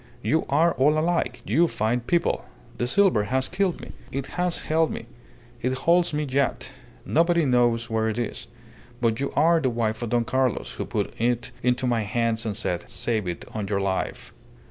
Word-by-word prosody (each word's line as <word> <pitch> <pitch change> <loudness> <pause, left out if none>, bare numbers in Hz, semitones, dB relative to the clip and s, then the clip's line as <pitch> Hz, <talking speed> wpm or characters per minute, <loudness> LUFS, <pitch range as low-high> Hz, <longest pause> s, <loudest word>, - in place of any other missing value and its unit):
You 155 +10 +1
are 160 +5 +3
all 150 +3 +4
alike, 170 +3 0
you 170 +2 +3
fine 115 -2 0
people. 170 +8 0 0.4
The 120 - 0
silver 180 - +3
has 130 +3 0
killed 185 -5 -1
me. 125 - -9 0.2
It 135 0 -3
has 180 -1 0
held 160 +1 +2
me. - - -6 0.6
It 130 +1 0
holds 170 +6 +3
me 150 0 -1
yet. 135 -1 -1 0.3
Nobody 170 0 +3
knows 120 -3 +2
where 110 0 0
it 110 - -3
is. 120 -2 -4 0.5
But 115 -2 +1
you 140 - -1
are 165 +2 +4
the 135 -5 +1
wife 115 -2 -1
of 120 - -3
Don 120 0 +1
Carlos, 130 -1 0
who - - -4
put - - -2
it 120 +1 0
into 125 +1 +1
my 120 -2 +1
hands 115 +2 0
and 105 -2 -2
said, 90 -5 -2
'Save 110 -5 -1
it 85 -1 -4
on 105 -2 -3
your 100 0 0
life. 95 -1 -2
125 Hz, 190 wpm, -25 LUFS, 115-155 Hz, 0.6 s, all